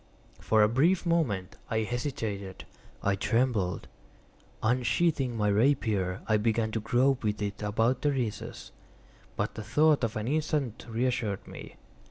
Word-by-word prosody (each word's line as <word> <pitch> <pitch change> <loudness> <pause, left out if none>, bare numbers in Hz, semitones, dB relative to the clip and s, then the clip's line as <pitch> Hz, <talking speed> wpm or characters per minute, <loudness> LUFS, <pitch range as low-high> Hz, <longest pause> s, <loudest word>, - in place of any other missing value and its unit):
For 110 -1 +3
a - - +6
brief 160 - +2
moment 130 - 0
I 110 -2 +1
hesitated—I 110 -5 -4
trembled. 115 -5 0 0.8
Unsheathing 125 +2 +1
my 105 -1 +1
rapier, 105 -5 +1
I 110 - +3
began 110 +1 0
to 110 - -1
grope 125 +4 +2
with 105 -1 -1
it 105 0 -4
about 115 +4 +1
the 145 - +2
recess; 125 -6 -4 0.6
but - - -2
the 110 - -6
thought 150 +6 +3
of 115 0 -1
an 110 0 -3
instant 145 -4 -1
reassured 115 -3 -1
me. - - -10
115 Hz, 135 wpm, -29 LUFS, 105-130 Hz, 0.8 s, a